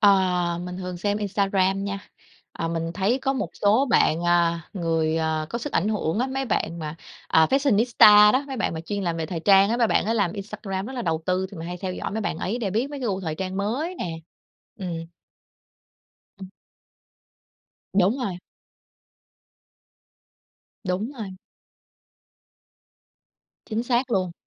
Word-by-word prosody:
Ờ, 180 -4 +3
mình 180 0 -6
thường 180 -1 -5
xem 205 +3 -1
Instagram 195 -1 +1
nha. 200 0 -3 0.5
Ờ, 165 - -3
mình 165 0 -2
thấy 205 +7 +1
có 270 - +1
một 265 - -3
số 215 +7 +3
bạn, 165 -6 +3
a, 170 -1 +3
người, 165 -4 0
à, 160 -1 -1
có 235 - -2
sức 280 +5 -5
ảnh 190 +6 +1
hưởng 205 -4 -1
á, 250 - +1
mấy 270 0 -2
bạn 170 -8 -1
mà, 155 -1 -5 0.3
à, 160 0 +5
fashionista 220 -5 +6
đó, 265 +2 +1
mấy 270 -2 -5
bạn 210 - -1
mà 160 - -4
chuyên 200 +4 -4
làm 170 -2 -1
về 160 - -2
thời 170 0 -4
trang 195 +3 +5
á, 235 - +1
mấy 240 -1 +3
bạn - - +2
á 225 - +1
làm 200 -6 +1
Instagram 200 -1 -5
rất 265 - -6
là 245 -2 -4
đầu 160 -3 -1
tư 185 +1 +1
thì 200 - -10
mình 165 - -6
hay 180 - -4
theo 185 -1 -3
dõi - - -4
mấy 220 +2 -3
bạn 165 - -2
ấy 215 +6 -2
để 205 -6 -2
biết 235 +8 -1
mấy 285 -1 -6
cái 250 - -2
gu 195 -2 -1
thời 160 -4 -3
trang 190 +2 -4
mới 255 - -2
nè. 165 -2 -4 0.6
Ừm. 170 -3 -4 1.3
Ừm. 190 - -7 1.4
Đúng 195 +5 +3
rồi. 195 -9 -3 2.5
Đúng 190 +8 -2
rồi. 195 -4 -6 2.3
Chính 225 0 -2
xác 245 +1 0
luôn. 185 -5 0
195 Hz, 175 wpm, -24 LUFS, 175-220 Hz, 2.5 s, fashionista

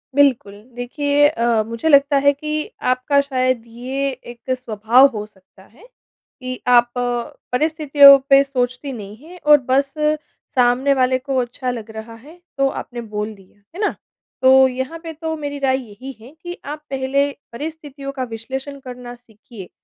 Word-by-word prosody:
बिल्कुल, 270 -8 +3 0.2
देखिए 285 +4 +2
अ, 235 -4 +1
मुझे 230 +7 -2
लगता 280 -1 +5
है 285 +1 +4
कि 305 +2 -4
आपका 255 +3 +1
शायद 255 -3 -1
ये 260 +4 -3 0.2
एक 240 +1 -8
स्वभाव 235 +2 +4
हो 210 0 -4
सकता 190 -2 -22
है 250 - -21 0.6
कि 255 0 -5
आप 240 -1 +5 0.6
परिस्थितियों 290 0 +6
पे 275 0 +7
सोचती 255 0 -3
नहीं 210 -3 -9
हैं 360 +1 -12
और 300 0 +8
बस 275 +1 +2
सामने 280 -3 0
वाले 255 -1 +2
को 270 0 -3
अच्छा 250 +1 -2
लग 230 -3 -7
रहा 220 +1 -9
है, 295 +10 -16 0.2
तो 275 0 +3
आपने 240 -2 -6
बोल 210 -1 -5
दिया। 195 0 -22 0.2
है - - -8
ना? 420 - 0 0.5
तो 265 0 +6
यहाँ 260 +5 -5
पे 325 -1 -6
तो 320 +1 -4
मेरी 285 -1 -5
राय 265 -1 +1
यही 255 +7 -9
है 240 +4 -13
कि 350 0 -6
आप 300 +1 -7
पहले 275 +1 0 0.2
परिस्थितियों 285 0 -7
का 270 -2 -4
विश्लेषण 265 +4 -6
करना 250 -2 -9
सीखिए। 220 -4 -14
260 Hz, 160 wpm, -20 LUFS, 240-285 Hz, 0.6 s, और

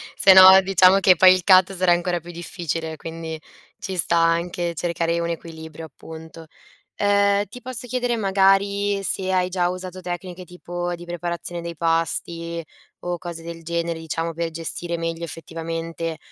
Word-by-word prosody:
se 195 - +6
no 190 0 +10
diciamo 190 0 +5
che 185 -1 +5
poi 185 +2 +7
il 185 - -1
cut 185 0 +5
sarà 185 -1 +3
ancora 175 0 -1
più 170 +1 -11
difficile, 165 -2 -5
quindi 160 0 -7 0.4
ci 190 - -5
sta 170 -1 +1
anche 170 +1 0
cercare 170 0 -1
un 170 - -2
equilibrio 160 -1 -8
appunto. 160 +2 -12 0.5
Uhm, 200 0 +2
ti 250 +6 -12
posso 250 -1 -7
chiedere 245 -1 -1
magari 200 0 +2
se 190 -1 -1
hai 185 -1 +1
già 180 -1 0
usato 185 0 -7
tecniche 180 0 -6
tipo 175 0 -5
di 175 0 -11
preparazione 175 0 -5
dei 170 -1 -7
pasti, 165 +1 -2 0.4
o 175 0 -3
cose 170 -1 -8
del 165 0 -9
genere, 170 0 -3
diciamo, 165 +1 -4
per 165 +1 -3
gestire 165 +1 -4
meglio 165 0 -4
effettivamente, 165 0 -5
175 Hz, 160 wpm, -22 LUFS, 165-185 Hz, 0.5 s, no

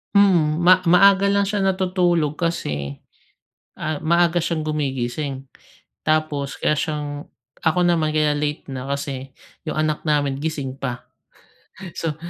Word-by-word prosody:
Hmm. 170 -6 +4
Ma 180 +2 +5
maaga 195 +3 +5
lang 200 0 +2
siya 200 -1 -1
natutulog 180 -5 +1
kasi, 75 - -3 0.8
ah, 155 0 -2
maaga 170 +1 +3
siyang 165 -1 -1
gumigising. 135 -2 -3 0.5
Tapos 155 -3 -1
kaya - - +1
siyang 145 -1 -3 0.3
ako 160 +3 +2
naman, 165 -3 +2
kaya 155 -1 +2
late 150 0 -2
na 130 +1 -6
kasi 140 -1 -4 0.4
yung - - -3
anak 155 -1 0
namin 145 -3 +1
gising 150 -4 -3
pa. 125 -2 -4 0.9
So, 160 -3 -2
155 Hz, 125 wpm, -22 LUFS, 140-175 Hz, 0.9 s, Ma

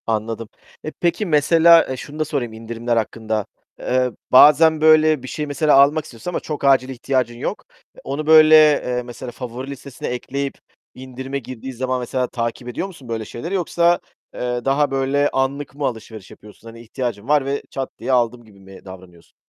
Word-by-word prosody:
Anladım. 115 0 -3 0.3
E, 155 - -5
peki 175 +6 -1
mesela, 165 +1 +5
eee, 130 - -4
şunu 145 +4 -9
da 155 - +1
sorayım 135 -7 -3
indirimler 115 +1 -3
hakkında, 110 -1 -2 0.3
eee, 125 0 0 0.2
bazen 150 +4 +6
böyle 155 -2 +4
bir - - -7
şeyi 150 +3 -4
mesela 145 +1 +2
almak 145 +3 +4
istiyorsun 120 +4 -8
ama - - -2
çok 150 -2 -6
acil 135 -2 +3
ihtiyacın 125 -2 -2
yok. - - -5 0.4
Onu 150 +3 -4
böyle, 155 0 +8
eee, 145 -5 +4
mesela 120 +1 -8
favori 125 +2 -7
listesine 140 -1 -8
ekleyip 135 +3 -4 0.4
indirime 130 +1 -6
girdiği 130 +1 -8
zaman 130 +1 -2
mesela 125 +1 -2
takip 120 0 -4
ediyor 125 +10 -4
musun 165 -10 -14
böyle 110 -1 -3
şeyleri 165 - -7
yoksa, 175 -1 +2 0.3
eee, 125 -1 -3
daha 140 +1 +1
böyle 135 +2 +1
anlık 135 +1 -2
mı 145 -1 -3
alışveriş 110 -5 -6
yapıyorsun? 105 +2 -16
Hani 115 0 -11
ihtiyacın 115 -2 -5
var 145 -2 +2
ve 140 +1 -2
çat 135 -1 -4
diye - - -3
aldım 120 -1 +1
gibi 100 -3 -19
mi 95 0 -15
davranıyorsun? 90 -3 -14
130 Hz, 175 wpm, -20 LUFS, 120-150 Hz, 0.4 s, böyle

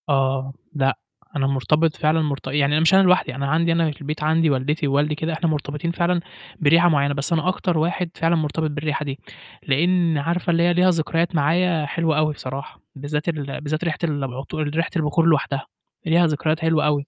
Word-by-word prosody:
آه، 135 -1 0 0.2
لأ، 135 -2 +1 0.4
أنا 135 -2 +1
مرتبط 150 +4 +1
فعلًا 160 +1 +1
مرت 140 -3 -3
يعني 140 +1 +1
أنا 150 - +3
مش 165 +3 +4
أنا 190 - +7
لوحدي، 180 -8 +2
أنا 140 +1 -3
عندي 165 +3 +2
أنا 165 -1 +1
في 150 - -14
البيت 150 +1 -4
عندي 160 +1 +2
والدتي 145 +3 0
ووالدي 145 +2 +1
كده 160 +2 -3
إحنا 165 +1 -1
مرتبطين 150 +2 -3
فعلًا 170 0 0 0.4
بريحة 165 +3 +5
معيّنة، 145 -2 +2
بس 140 +4 -1
أنا 160 +1 0
أكتر 180 -2 -1
واحد 175 +2 -1
فعلًا 165 +1 +1
مرتبط 155 0 -1
بالريحة 150 0 -3
دي، 135 -1 -5 0.4
لإن 165 +3 +2
عارفة 170 +5 -1
اللي 170 0 +2
هي 175 0 +3
ليها 180 +1 +4
ذكريات 165 0 0
معايا 165 +2 +2
حلوة 160 +1 0
أوي 155 0 +2
بصراحة، 135 -1 -8
بالذّات 150 +3 -3
ال 145 -4 -4
بالذّات 155 +2 -3
ريحة 165 -3 -1
ال 150 -4 -1
العطور 135 +4 -4
ريحة 160 +3 -1
البخور 160 0 +1
لوحدها 140 -4 +1 0.4
ليها 170 +1 +4
ذكريات 155 +1 -1
حلوة 160 -2 +1
أوي، 145 -1 0
155 Hz, 195 wpm, -22 LUFS, 145-165 Hz, 0.4 s, أنا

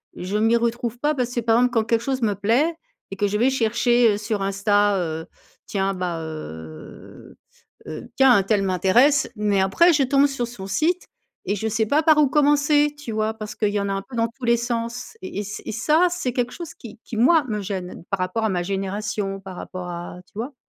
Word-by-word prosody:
je 190 +4 -3
m'y 225 +2 +3
retrouve 235 0 -2
pas 295 +3 +1
parce 250 -3 -2
que 245 - 0
par 225 0 +3
exemple 250 0 +2
quand 225 -2 +2
quelque 225 +1 +1
chose 265 +1 -2
me 210 -2 +2
plaît 240 - +1 0.4
et - - -4
que 205 - +1
je 205 +1 -1
vais 245 +5 +3
chercher, 240 -1 +3
heu, - - -2
sur 210 -1 -3
Insta, 200 +1 +2
heu, 160 -2 -3 0.4
tiens 195 -1 -1
ben, 180 -3 -3
heu, 80 - -10 0.5
heu, 155 - -7
tiens 265 -2 +6
untel 200 +1 +1
m'intéresse 230 - +3
mais 205 -2 +1
après 330 - +4
je 290 -3 +3
tombe 275 +2 +4
sur 270 -4 -3
son 205 -5 -8
site 320 - 0 0.4
et 200 - 0
je 220 +2 -3
sais 220 0 0
pas 290 +8 +2
par 310 -1 +5
où 300 -2 +5
commencer, 295 +1 +3
tu 290 -6 -7
vois? 215 0 -1
Parce 215 -1 -7
qu'il 210 - +1
y 205 0 -1
en 200 - -2
a - - 0
un 195 - -2
peu 255 - -8
dans 230 0 +1
tous 255 - -6
les 235 0 +4
sens 235 - -4
et 360 - -5
ç 205 +1 -7
et - - -4
ça 305 - +3
c'est 340 -8 -3
quelque 245 -1 -1
chose 340 -2 -8
qui 225 -3 -12
qui 225 - -7
moi 305 +7 +5
me 210 -3 -2
gêne 185 -3 -5
par 195 - -1
rapport 185 +5 -1
à - - +1
ma 180 -2 -1
génération, 195 +1 -3
par 190 -1 -9
rapport 180 0 -7
à 175 0 -7
tu - - -30
vois? 255 +5 -5
220 Hz, 225 wpm, -23 LUFS, 195-255 Hz, 0.5 s, tiens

